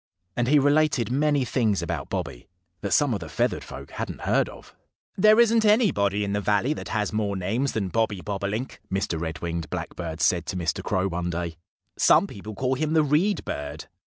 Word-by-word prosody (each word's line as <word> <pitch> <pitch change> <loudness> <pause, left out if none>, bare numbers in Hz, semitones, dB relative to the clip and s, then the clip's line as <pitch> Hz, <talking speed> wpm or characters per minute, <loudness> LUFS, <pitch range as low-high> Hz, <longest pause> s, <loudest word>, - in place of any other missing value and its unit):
And 120 0 0
he 150 +3 +5
related 145 -3 +3
many 145 0 +2
things 110 -5 +1
about - - -4
Bobby - - -4 0.3
that 100 - -2
some 145 -4 +3
of 105 - -2
the - - -8
feathered - - 0
folk - - -10
hadn't - - -5
heard - - +1
of. - - -14 0.4
"There 215 +3 +6
isn't 230 -1 +5
anybody 140 - +3
in 100 0 -2
the 105 - 0
valley 105 +8 +1
that - - -7
has 105 -1 -1
more 105 -2 0
names 110 +9 -1
than 100 -4 -1
Bobby 110 -2 0
Bobolink," 100 +6 -4
Mr. 95 -4 -1
Red 80 -1 -5
winged 85 -2 -3
Blackbird 80 0 -5
said 90 -2 +2
to 95 - -3
Mr. 80 -4 -2
Crow 95 +1 0
one 90 -1 -3
day. 85 -1 -3 0.4
"Some - - +5
people 105 +2 -9
call 130 +4 0
him 155 +4 -1
the 160 -1 +4
Reed 155 +8 +1
Bird. 70 +1 -5
105 Hz, 195 wpm, -25 LUFS, 90-145 Hz, 0.4 s, There